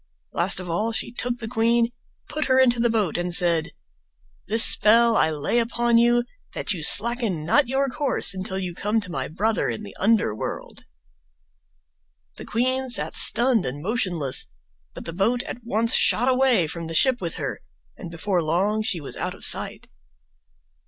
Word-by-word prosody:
Last 180 +2 +1
of 185 - -8
all 210 +7 -2
she 225 - -4
took 245 0 -3
the 225 -2 -7
queen, 230 +1 0 0.4
put 305 0 -3
her 260 -1 +1
into 245 -2 +3
the 235 0 +1
boat 210 -7 -1
and 175 0 -3
said: 170 -2 +3 0.8
"This 225 +2 +6
spell 230 +2 +5
I 160 - +2
lay 155 +9 -1
upon 235 0 +1
you, 240 +1 +2 0.3
that - - -2
you 170 - -7
slacken 215 -3 +4
not 275 - +2
your 270 +2 -1
course 270 -6 -1
until 190 0 -5
you 185 -2 -5
come 210 +5 -1
to 180 -3 -10
my 135 -4 -4
brother 215 +7 -2
in 215 - -5
the 205 - -11
under 210 - +1
world." - - -7 1.5
The - - -9
queen 255 +3 -2
sat 240 - 0
stunned 240 -2 +3
and 135 +3 -6
motionless, 180 - -1 0.5
but - - -10
the 165 - -7
boat 225 +7 -1
at 240 - -9
once 230 +1 +1
shot 245 - +2
away 255 -7 +2
from 165 +1 -6
the 165 - -6
ship 255 +5 +2
with 170 -2 -4
her, - - -5 0.4
and 175 - -10
before 175 +2 -2
long 190 +7 -1
she 215 -5 -2
was 145 - -9
out - - -4
of - - -4
sight. - - -1
220 Hz, 180 wpm, -22 LUFS, 175-240 Hz, 1.5 s, This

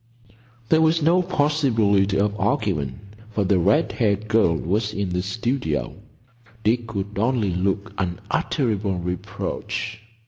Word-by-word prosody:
There 160 - +5
was 160 0 +3
no 170 +4 +4
possibility 125 - +2
of 105 0 +1
arguing, 100 - -1 0.3
for 105 -1 0
the 95 -1 +2
red 105 - +3
haired 105 -3 0
girl 110 -7 +3
was 105 +6 -1
in 100 -2 -1
the 90 0 -1
studio. 100 - -2 0.7
Dick 115 +2 +1
could 100 -1 -4
only 115 -3 +1
look 100 +3 -1
unutterable 100 +3 -1
reproach. 90 +5 -4
105 Hz, 125 wpm, -23 LUFS, 95-120 Hz, 0.7 s, There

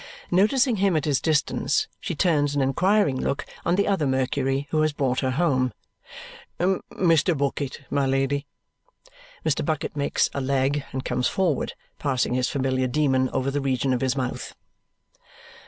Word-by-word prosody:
Noticing 225 +6 +3
him 195 -4 +2
at 150 - -1
his 145 -3 +1
distance, 155 -2 +1
she - - -4
turns 145 -4 +2
an 140 - +2
inquiring 180 +2 +2
look 140 - -2 0.2
on 170 - +2
the 200 - +1
other 190 -8 +1
Mercury 135 +1 0
who 155 - +2
has 155 -1 +1
brought 130 -3 0
her 130 - 0
home. 130 -4 +1 0.9
"Mr. 175 -2 +1
Bucket, 140 0 -2
my 140 -1 +1
Lady." 135 +2 0 1.0
Mr. - - +1
Bucket 155 -3 -2
makes 140 -1 +1
a 140 - -2
leg 135 +1 0
and 130 0 -4
comes 125 0 0
forward, 175 -8 0 0.3
passing 130 -4 0
his 125 0 +1
familiar 130 -2 0
demon 130 -1 +1
over 130 +1 -1
the 145 +1 -1
region 135 -1 0
of 125 - -1
his 130 0 +1
mouth. 125 -1 -4
140 Hz, 155 wpm, -24 LUFS, 130-160 Hz, 1.0 s, Noticing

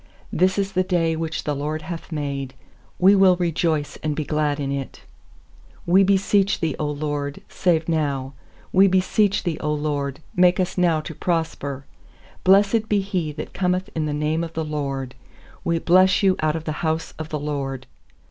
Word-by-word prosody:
24This 185 +3 +2
is 195 -1 0
the 185 -1 +1
day 170 -3 +1
which 160 0 -3
the 150 - -1
LORD 150 +2 -3
hath 165 +1 -7
made; 140 -3 -4 0.4
We 190 +2 +6
will 190 -2 +6
rejoice 165 -3 -1
and 155 -1 -1
be 155 - -2
glad 150 -1 0
in 140 -1 -2
it. 140 -1 -5 0.9
25We 190 +3 +5
beseech 200 +1 +2
Thee, 160 -3 0
0 150 - -1
LORD, 145 -1 -3
save 165 -3 +1
now! 140 -5 -1 0.4
We 195 +1 +6
beseech 190 +2 +2
Thee, 165 -3 -2
0 150 0 0
LORD, 145 -2 -2 0.2
make 180 0 +4
us 185 0 0
now 170 -4 +2
to 155 - -7
prosper! 145 -5 -2 0.6
26Blessed 205 +3 +4
be 205 -1 +2
he 185 -6 -2
that - - -7
cometh 185 +1 -1
in 155 -2 -1
the - - -2
name 155 +2 0
of 165 -1 -6
the 160 -1 -2
LORD; 135 -4 -3 0.5
We 170 0 +1
bless 185 +4 +4
you 190 -1 +4
out 155 0 +1
of 160 - -4
the 155 - -3
house 160 0 -1
of 155 0 -5
the 155 - -2
LORD. 140 -3 -4
160 Hz, 180 wpm, -23 LUFS, 150-185 Hz, 0.9 s, We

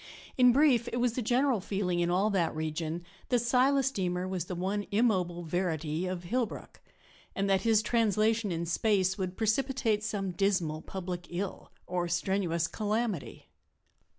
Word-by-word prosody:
In 250 -1 +6
brief, 250 -3 +4
it 240 - -3
was 240 -1 +1
the 250 - -2
general 245 +1 +2
feeling 185 -2 -1
in 170 0 +1
all 195 +4 +2
that 175 -6 0
region 160 +2 -3 0.2
that 245 - +3
Silas 260 +3 +3
Deemer 180 -4 -2
was 185 -3 -3
the 180 - -5
one 195 +3 -2
immobile 190 -6 +1
verity 165 -1 -2
of 180 -1 -4
Hillbrook, 235 +5 -3 0.5
and 195 0 0
that 195 -1 +3
his 220 0 +3
translation 220 -1 +2
in 170 0 -2
space 190 +2 +1
would 185 -1 -3
precipitate 225 -1 +1
some 205 -3 -2
dismal 175 -4 0
public 180 -2 -6
ill 185 +2 -5
or 175 -1 -2
strenuous 175 -1 0
calamity. 215 -4 -2
195 Hz, 150 wpm, -30 LUFS, 175-225 Hz, 0.5 s, In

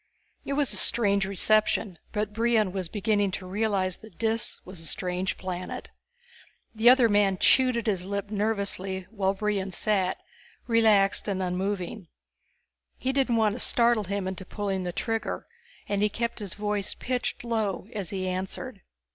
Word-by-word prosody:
It 280 - -2
was 285 -1 +1
a - - -1
strange 200 -4 +2
reception, 200 -1 +1
but 210 0 -2
Brion 225 -3 +2
was 185 -2 -3
beginning 205 0 +1
to 185 - -4
realize 190 -1 0
that 215 -6 -15
Dis 225 0 -1
was 185 -1 -9
a 165 - -6
strange 180 +1 -1
planet. 185 -1 -5 0.8
The 225 +2 +5
other 250 -2 +7
man 205 -3 +3
chewed 255 +4 +4
at 235 - -2
his 195 -5 0
lip 200 +2 -4
nervously 200 -3 -1
while 195 -3 0
Brion 195 -1 -1
sat, 190 -1 +1 0.5
relaxed 220 -5 +4
and 190 -2 -1
unmoving. 185 +1 -2 0.9
He 260 +1 -1
didn't 265 -3 +2
want 220 -2 +3
to 240 - -6
startle 235 -3 +3
him 200 0 -2
into 190 0 -4
pulling 195 -1 -3
the 175 - -2
trigger, 225 +4 -2 0.4
and 200 0 0
he 210 - +3
kept 235 +3 -2
his 200 -4 -3
voice 210 -1 -1
pitched 250 -1 -2
low 220 -5 -1
as 200 -5 -4
he 190 -2 -3
answered. 185 +1 -4
205 Hz, 160 wpm, -27 LUFS, 190-225 Hz, 0.9 s, other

